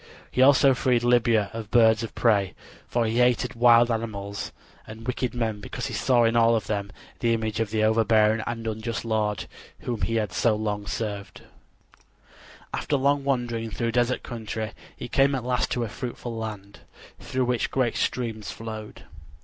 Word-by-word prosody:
He 130 - +1
also 135 0 +6
freed 125 -1 +1
Libya 115 -4 +3
of 110 -2 -6
birds 110 -1 +5
of 115 - -6
prey; 100 -5 +2 0.3
for 120 -1 0
he 115 +2 0
hated 125 +1 +2
wild 120 0 +5
animals 100 -3 -4 0.4
and 110 +1 -10
wicked 125 0 -2
men 110 -3 -1
because 125 - -5
he 130 - -5
saw 120 +2 +3
in 115 0 +2
all 115 0 +5
of 110 - -1
them 100 -2 -3 0.3
the 115 -1 +2
image 110 -1 -3
of 115 -2 0
the 110 0 0
overbearing 110 0 +3
and 115 -1 -4
unjust 110 +1 -3
lord 105 -3 -1 0.4
whom 120 -3 -4
he 115 - 0 0.2
so 110 +4 +2
long 105 -1 -3
had - - -7
served. 105 -3 -5 1.3
After 145 - 0
long 140 +1 +2
wandering 120 -4 -1
through 115 +3 -2
desert 120 +1 +1
country 110 -2 -5 0.3
he - - -6
came 135 +3 +3
at 130 - -3
last 125 0 0
to 120 - -1
a - - -2
fruitful 120 +1 -6
land, 105 -3 -7 0.4
through 130 -1 -1
which 125 -1 0
great 125 -4 0
streams 115 -4 -2
flowed. 110 -1 -8
115 Hz, 175 wpm, -25 LUFS, 110-120 Hz, 1.3 s, also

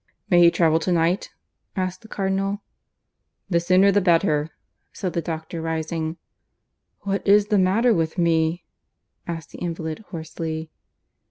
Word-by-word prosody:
"May 175 - +6
he 170 - +8
travel 165 -2 +3
to 180 - -1
night?" 170 +3 +1 0.5
asked 185 -1 -2
the 220 - -14
Cardinal. 195 0 -2 0.9
"The 170 - +4
sooner 185 +3 +4
the 205 +1 +3
better," 165 -4 +2 0.4
said 185 -3 -4
the 170 - 0
doctor, 160 0 -5
rising. 160 0 -3 0.8
"What 195 0 -1
is 205 +1 +5
the 210 -2 +3
matter 215 +6 +3
with 165 -1 -1
me?" 165 0 +1 0.6
asked 165 -3 -6
the - - -10
invalid 165 -2 -4
hoarsely. 160 -1 -5
170 Hz, 140 wpm, -23 LUFS, 160-190 Hz, 0.9 s, he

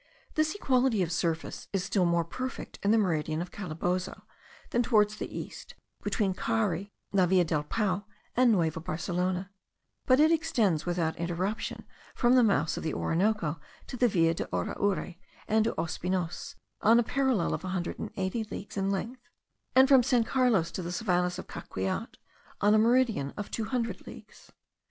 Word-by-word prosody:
This 310 +2 +1
equality 255 - +2
of 170 - -3
surface 165 -1 -2
is 195 -2 -1
still 185 -1 +1
more 170 -1 +2
perfect 255 +9 -6
in 200 - +1
the 225 - +5
meridian 160 -6 0
of 175 +1 -5
Calabozo, 180 0 -3 0.5
than 240 - +2
towards 215 -3 +3
the - - -5
east, - - -8 0.3
between 200 -4 0
Cari, 200 -2 -1 0.2
La 190 -2 +4
Villa 180 0 +4
del 155 -3 0
Pao, 195 +4 -1 0.3
and 250 -1 +5
Nueva 165 -6 +1
Barcelona; 180 +3 -2 0.6
but 255 +1 +5
it 310 +2 +6
extends 230 - +1
without 170 -2 0
interruption 180 +5 -3 0.3
from 240 0 +3
the 255 - +6
mouths 165 -8 +2
of - - -4
the 160 - -2
Orinoco 170 -3 0 0.3
to 255 - -7
La 245 - +6
Villa 165 -6 +3
de - - -3
Araure 180 - -1 0.3
and 220 0 +3
to 230 - -1
Ospinos, 175 +1 -3 0.3
on 230 +2 +6
a - - +3
parallel 260 -7 +1
of - - -3
a - - -4
hundred 180 -2 -3
and - - -4
eighty 190 +4 -1
leagues 205 -1 -8
in 195 0 0
length; 230 +6 -3 0.5
and 260 +1 +7
from 270 -2 +7
San 245 -1 +3
Carlos 225 -8 +2
to - - -4
the 175 0 -4
savannahs 180 -2 0
of - - -6
Caqueat, 95 0 -4 0.4
on 205 +1 +4
a 215 - +5
meridian 230 - +2
of 205 - -5
two 225 - -2
hundred 230 -4 -3
leagues. - - -13
195 Hz, 175 wpm, -29 LUFS, 170-230 Hz, 0.6 s, and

